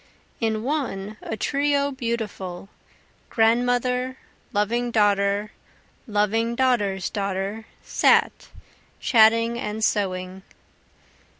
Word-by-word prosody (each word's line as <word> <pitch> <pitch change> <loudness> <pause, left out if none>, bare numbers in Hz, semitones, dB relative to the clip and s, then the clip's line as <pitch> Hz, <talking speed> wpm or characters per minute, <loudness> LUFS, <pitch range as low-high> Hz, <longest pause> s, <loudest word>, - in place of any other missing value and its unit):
In 220 -2 -1
one 225 -8 -3
a 220 - -5
trio 285 +1 +1
beautiful, 215 -7 -4 0.6
Grandmother, 245 +3 +1 0.3
loving 235 +4 0
daughter, 205 -1 +2 0.6
loving 225 +2 0
daughter's 210 -7 +1
daughter, 200 +2 -3 0.2
sat, - - +2 0.5
Chatting 230 +1 +4
and 215 -1 -2
sewing. 185 -2 -2
220 Hz, 80 wpm, -24 LUFS, 200-245 Hz, 0.6 s, Chatting